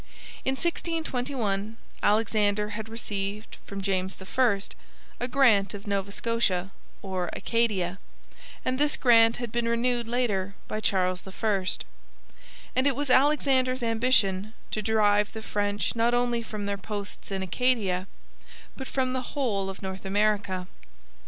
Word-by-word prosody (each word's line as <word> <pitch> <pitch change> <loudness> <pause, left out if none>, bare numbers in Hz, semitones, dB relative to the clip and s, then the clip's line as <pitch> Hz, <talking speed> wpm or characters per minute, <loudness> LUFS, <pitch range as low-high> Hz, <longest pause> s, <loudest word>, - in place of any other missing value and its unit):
In 265 - +1
1621 255 - -2 0.2
Alexander 210 -1 +2
had 220 +1 -5
received 205 -2 -4
from 200 -1 -5
James 190 -1 -1
I 205 +2 +2 0.6
a 245 - -1
grant 225 -8 +4
of 200 - -9
Nova 200 -1 -1
Scotia 200 -4 0 0.3
or 185 -3 -2
Acadia, 200 -6 0 0.7
and 255 +1 0
this 295 0 +3
grant 230 -2 +6
had 240 -2 -4
been 235 0 0
renewed 235 0 +1
later 205 -6 0
by 215 - -3
Charles 185 -3 +1
I. 195 0 0 1.1
And 260 +2 +3
it 275 - +2
was 285 -1 -1
Alexander's 260 -2 +3
ambition 220 -3 +2 0.2
to 215 - -1
drive 210 -1 +3
the 220 -1 -6
French 205 +1 -1
not 235 +1 +3
only 240 -1 +1
from 215 -2 -5
their 200 0 -2
posts 205 +1 -6
in 195 -1 -2
Acadia 195 -3 +1 0.7
but 265 - -6
from 255 -1 0
the 260 - -1 0.2
whole 200 -8 0
of 195 +1 -8
North 190 0 -5
America. 200 -2 +1
215 Hz, 135 wpm, -27 LUFS, 195-245 Hz, 1.1 s, grant